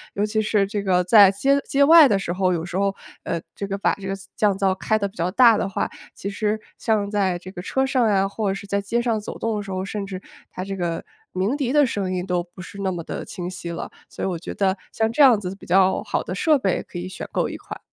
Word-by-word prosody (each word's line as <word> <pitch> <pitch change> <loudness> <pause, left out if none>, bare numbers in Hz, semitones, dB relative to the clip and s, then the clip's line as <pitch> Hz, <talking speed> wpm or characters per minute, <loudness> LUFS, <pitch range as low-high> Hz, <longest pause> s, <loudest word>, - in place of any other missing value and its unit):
尤 205 - +1
其 215 +1 0
是 210 -2 +2
这 205 +1 -3
个 185 -2 +2
在 200 +2 +7
街 275 +9 +2
街 280 +1 +4
外 320 0 +9
的 205 - +2
时 175 -3 -3
候， 185 0 +1
有 170 -2 -1
时 175 - -7
候， 195 0 +1 0.3
呃， 170 - -3 0.2
这 200 - -4
个 195 0 -3
把 200 - +1
这 195 -1 -7
个 195 - -2 0.2
降 205 -3 +2
噪 195 -1 +2
开 215 +3 0
得 200 - -1
比 195 - -16
较 175 -2 -1
大 230 +3 +6
的 - - -1
话， 195 - -1 0.3
其 - - -6
实 215 +1 -1 0.2
像 210 -3 0
在 190 -4 +1
这 185 +1 -10
个 180 -2 -7
车 265 +7 0
上 250 -4 +2
呀， 195 -1 +2
或 200 0 -2
者 195 - -1
是 195 - -8
在 200 0 -1
街 230 +4 -1
上 235 -2 0
走 210 - -7
动 225 -1 -1
的 205 - -2
时 200 - -9
候， 185 0 -3
甚 200 0 -4
至 190 -2 -6 0.3
它 185 - -6
这 195 +1 -4
个 170 -3 -3 0.3
鸣 190 +8 0
笛 270 -4 -1
的 295 -1 +5
声 200 -5 -2
音 180 0 -2
都 180 -2 0
不 175 +1 -11
是 200 - -10
那 190 -1 0
么 175 -2 -5
的 - - -5
清 175 -1 -6
晰 180 -1 -6
了。 170 - -5 0.2
所 - - -5
以 - - 0
我 175 -3 -3
觉 - - -7
得 190 -1 +1 0.2
像 220 0 0
这 295 - +1
样 250 -6 +7
子 190 -1 -5
比 200 - -15
较 190 +1 +3
好 - - -2
的 - - -5
设 310 -2 +3
备 195 -9 0
可 - - -10
以 175 - -4
选 185 - -7
购 - - 0
一 - - -6
款。 - - -9
195 Hz, 300 characters per minute, -23 LUFS, 185-215 Hz, 0.3 s, 外